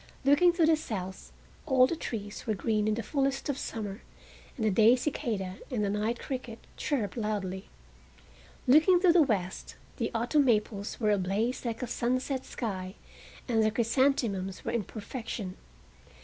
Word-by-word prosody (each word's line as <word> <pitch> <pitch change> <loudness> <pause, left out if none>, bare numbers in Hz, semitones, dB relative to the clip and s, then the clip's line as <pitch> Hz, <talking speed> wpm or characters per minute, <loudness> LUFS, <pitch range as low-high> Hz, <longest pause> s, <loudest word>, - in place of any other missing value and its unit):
Looking 290 +6 +6
to 340 -2 +3
the 320 0 +5
south 190 -11 -6 0.4
all 260 -3 +6
the 300 - -1
trees 210 -9 -6
were 215 - +1
green 215 0 0
in 215 - +2
the 230 - -3
fullness 270 +1 -1
of 285 - +1
summer, 210 -1 -5 0.6
and 220 - -1
the 215 - +3
day 220 +5 +6
cicala 215 -8 -3
and 235 -5 -1
the 200 - 0
night 215 +3 -1
cricket 250 -4 -5 0.2
chirruped 225 -10 -2
loudly. 205 -4 -3 1.0
Looking 315 +7 +6
to 360 -3 +6
the 345 - +6
west 200 - -1 0.2
the 230 - -1
autumn 250 +6 +2
maples 210 -3 0
were 215 -3 +2
ablaze 205 +6 0
like 235 +1 -3
a - - -2
sunset 255 +3 -1
sky, 190 -4 -4 0.5
and 230 -3 +2
the 215 - +4
chrysanthemums 225 -5 0
were - - -1
in 230 -4 -1
perfection. 215 -3 -6
225 Hz, 160 wpm, -29 LUFS, 205-260 Hz, 1.0 s, Looking